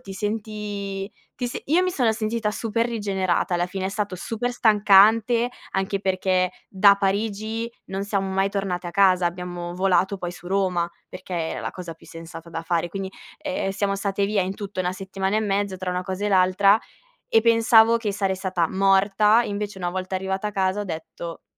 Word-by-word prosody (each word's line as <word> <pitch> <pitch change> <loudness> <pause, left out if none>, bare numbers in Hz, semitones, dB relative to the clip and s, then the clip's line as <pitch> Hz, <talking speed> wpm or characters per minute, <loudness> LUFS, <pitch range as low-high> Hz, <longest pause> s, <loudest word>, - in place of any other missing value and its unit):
ti 195 -6 -9
senti, 205 -1 -4 0.2
ti 245 - -2
se 240 - -5
io 335 +6 +3
mi 370 - +1
sono 250 -10 +2
sentita 220 0 -1
super 230 +2 -1
rigenerata. 195 -6 -1
Alla 175 0 +1
fine, 190 +1 -5
è - - 0
stato 205 -2 -3
super 225 +6 -3
stancante, 220 +1 +5 0.2
anche 195 +1 -1
perché 190 -1 0 0.3
da 200 +1 +6
Parigi 215 +3 -1 0.2
non 195 +1 -4
siamo 200 -1 -1
mai 195 +1 +1
tornate 190 -3 -2
a - - -4
casa. 185 -1 +4
Abbiamo 175 0 -5
volato, 190 +1 +2
poi, 175 -1 -4
su 175 - -13
Roma, 185 -3 +1 0.2
perché 185 0 -8
era 165 -1 -2
la - - -3
cosa 175 -3 -8
più - - -19
sensata 165 0 -10
da 165 0 -4
fare. 170 0 0
Quindi, 190 +1 -5 0.3
ehm, 290 -8 -2
siamo 200 0 -1
state 200 0 -1
via, 205 -1 +1
in 185 +1 -3
tutto 200 -2 -5
1 180 0 -1
settimana 195 +1 -2
e - - +2
mezza, 200 -2 -1
tra 185 0 -3
una 180 0 -2
cosa 190 +2 -4
e - - +1
l'altra. 195 +2 +4 0.5
E 225 - +4
pensavo 230 0 +5
che 215 -3 -2
sarei 195 -1 0
stata 185 -3 -1
morta, 195 +3 +4
invece, 205 -2 -4
una 175 -2 -2
volta 185 +1 -4
arrivata 190 +2 -2
a - - -4
casa, 190 +1 0
ho - - -3
detto: 165 0 -7
195 Hz, 190 wpm, -24 LUFS, 185-210 Hz, 0.5 s, da